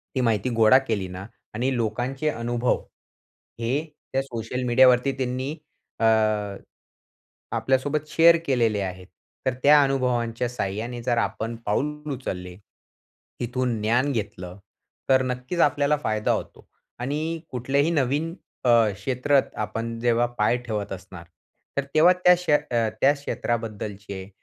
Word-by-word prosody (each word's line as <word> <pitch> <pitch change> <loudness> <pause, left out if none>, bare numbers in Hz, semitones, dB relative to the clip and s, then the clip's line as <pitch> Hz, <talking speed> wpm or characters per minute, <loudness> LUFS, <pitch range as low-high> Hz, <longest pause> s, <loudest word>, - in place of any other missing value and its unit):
ती 130 - +1
माहिती 115 -1 +1
गोळा 115 +3 +6
केली 100 -5 -1
ना 90 +1 -8 0.3
आणि 125 +4 0
लोकांचे 125 +6 -1
अनुभव 120 -2 -1 0.8
हे 115 +2 -1 0.4
त्या 135 - +2
सोशल 125 0 -4
मीडियावरती 125 +2 +5
त्यांनी 130 +1 -2 0.5
अ, 115 - +2 1.5
आपल्यासोबत 145 +3 0
शेअर 165 +2 +6
केलेले 115 -7 +2
आहेत. 90 -1 -5 0.4
तर 130 - +2
त्या 145 +1 +7
अनुभवांच्या 125 -3 0
सहाय्याने 115 +1 -4
जर 120 0 +1
आपण 115 0 -2
पाऊल 150 +7 -2
उचलले, 90 -8 -6 0.9
इथून 125 0 -1
ज्ञान 120 +6 +2
घेतलं, 100 -6 -5 0.5
तर 130 0 +5
नक्कीच 125 +7 -3
आपल्याला 145 0 +3
फायदा 110 -6 0
होतो. - - -4 0.3
आणि 155 +6 -2
कुठल्याही 135 +5 +1
नवीन 150 +2 0 0.3
अ, - - +4 0.2
क्षेत्रात 130 +7 +1 0.2
आपण 115 +2 -5
जेव्हा 120 0 +2
पाय 105 +3 +3
ठेवत 105 -3 -3
असणार, 95 -2 -9 0.5
तर 140 - +2
तेव्हा 170 +4 +7
त्या 180 0 +5
क्ष 180 0 -7
अ, 120 -6 +2
त्या 140 +2 +6
क्षेत्राबद्दलचे 105 -7 -4
125 Hz, 125 wpm, -24 LUFS, 110-140 Hz, 1.5 s, त्या